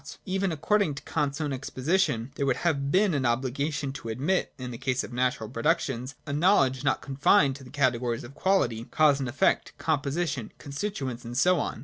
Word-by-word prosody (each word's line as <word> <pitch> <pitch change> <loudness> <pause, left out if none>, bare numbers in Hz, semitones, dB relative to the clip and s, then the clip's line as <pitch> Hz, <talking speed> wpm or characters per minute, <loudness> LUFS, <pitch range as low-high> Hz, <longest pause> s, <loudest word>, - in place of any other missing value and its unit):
Even 190 0 0
according 160 +1 +1
to 140 - -8
Kant's 145 -1 -1
own 150 -3 -1
exposition, 130 -1 0
there 140 -1 -2
would 130 - +3
have 140 -4 +1
been 195 +1 +3
an 140 -3 0
obligation 135 +4 -1
to 135 -4 -7
admit, 145 +12 0
in 125 -1 -6
the 120 - -7
case 130 -1 0
of - - -8
natural 125 -3 0
productions, 130 +1 -1
a 140 - -4
knowledge 145 -5 +3
not 140 - +1
confined 140 0 +3
to 140 - -13
the 125 - -12
categories 125 -3 0
of 120 - -10
quality, 125 - +1
cause 150 -1 +3
and 130 -2 -2
effect, 125 - +1
composition, 145 -4 -1
constituents, 140 - -4
and 120 +1 -6
so 180 +4 +4
on. - - -3
140 Hz, 190 wpm, -27 LUFS, 125-155 Hz, -, so